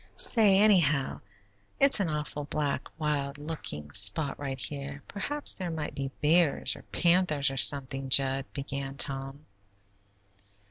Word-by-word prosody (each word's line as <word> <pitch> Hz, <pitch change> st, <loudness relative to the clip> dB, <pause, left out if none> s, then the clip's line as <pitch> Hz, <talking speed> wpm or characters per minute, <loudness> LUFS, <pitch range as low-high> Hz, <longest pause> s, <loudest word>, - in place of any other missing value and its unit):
"Say, 210 Hz, -5 st, +4 dB
anyhow, 170 Hz, -10 st, +3 dB, 0.6 s
it's 275 Hz, -3 st, +4 dB
an 190 Hz, -5 st, 0 dB
awful 150 Hz, -1 st, -4 dB
black, 145 Hz, 0 st, -3 dB
wild 145 Hz, -2 st, -2 dB
looking 145 Hz, -, -6 dB
spot 100 Hz, -, +1 dB
right 135 Hz, -2 st, -5 dB
here; 140 Hz, 0 st, -4 dB
perhaps 290 Hz, +9 st, 0 dB
there 185 Hz, -2 st, -5 dB
might 160 Hz, -2 st, -5 dB
be 135 Hz, -1 st, -4 dB
bears, 160 Hz, 0 st, +2 dB
or -, -, -12 dB
panthers, 170 Hz, -5 st, +2 dB
or 135 Hz, -, -6 dB
something, 135 Hz, 0 st, +1 dB
Jud," 135 Hz, 0 st, +3 dB
began 140 Hz, 0 st, -5 dB
Tom. 135 Hz, +2 st, -1 dB
145 Hz, 130 wpm, -28 LUFS, 135-165 Hz, 0.6 s, Say